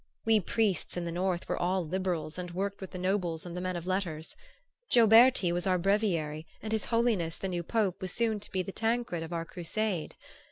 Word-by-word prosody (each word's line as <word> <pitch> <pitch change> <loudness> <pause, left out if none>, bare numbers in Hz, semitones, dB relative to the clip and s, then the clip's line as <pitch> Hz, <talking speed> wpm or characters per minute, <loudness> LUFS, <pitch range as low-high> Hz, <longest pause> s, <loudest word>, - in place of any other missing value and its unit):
We 225 -1 +5
priests 200 -2 0
in 175 - -2
the 170 - -3
north 180 0 -1
were - - -2
all 180 0 +1
liberals 175 -2 -2
and 180 0 -4
worked 195 +3 -3
with 190 - -6
the - - -7
nobles 180 -3 -1
and 175 -1 -7
the 180 - -3
men 185 0 -2
of 170 -1 -5
letters. 180 -4 -2 0.5
Gioberti 230 -4 +6
was 175 +2 0
our 185 -1 +3
breviary 170 -5 0
and 220 - -6
his 220 -1 0
Holiness 225 -9 +1
the 195 - -3
new 175 -2 -2
Pope 200 0 0
was 185 -1 -2
soon 225 -1 0
to 210 - -10
be 185 -1 0
the 195 - -6
Tancred 225 -5 -1
of 165 +1 -6
our 165 -1 -2
crusade. 180 +1 -3
185 Hz, 210 wpm, -30 LUFS, 170-210 Hz, 0.5 s, Gioberti